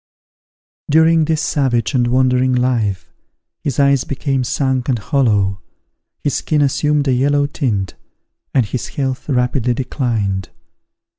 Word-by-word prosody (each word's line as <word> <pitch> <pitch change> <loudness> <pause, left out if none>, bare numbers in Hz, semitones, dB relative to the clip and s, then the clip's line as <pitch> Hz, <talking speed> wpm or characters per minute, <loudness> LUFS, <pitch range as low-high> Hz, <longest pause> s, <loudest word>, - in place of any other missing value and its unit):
During 160 +1 +4
this 155 -1 0
savage 130 -4 0
and 125 -2 +2
wandering 130 0 +2
life, 120 -6 0 0.5
his 140 -2 -3
eyes 140 -2 +3
became 135 -1 -2
sunk 130 0 -1
and 125 - +2
hollow, 105 -5 +1 0.6
his 145 - 0
skin 150 -2 +1
assumed 145 +1 +1
a 130 - +3
yellow 145 +3 +2
tint, 115 - -2 0.6
and 130 -4 +2
his 120 +4 -4
health 130 0 -4
rapidly 125 -1 +1
declined. 115 -7 -2
130 Hz, 125 wpm, -17 LUFS, 120-140 Hz, 0.6 s, During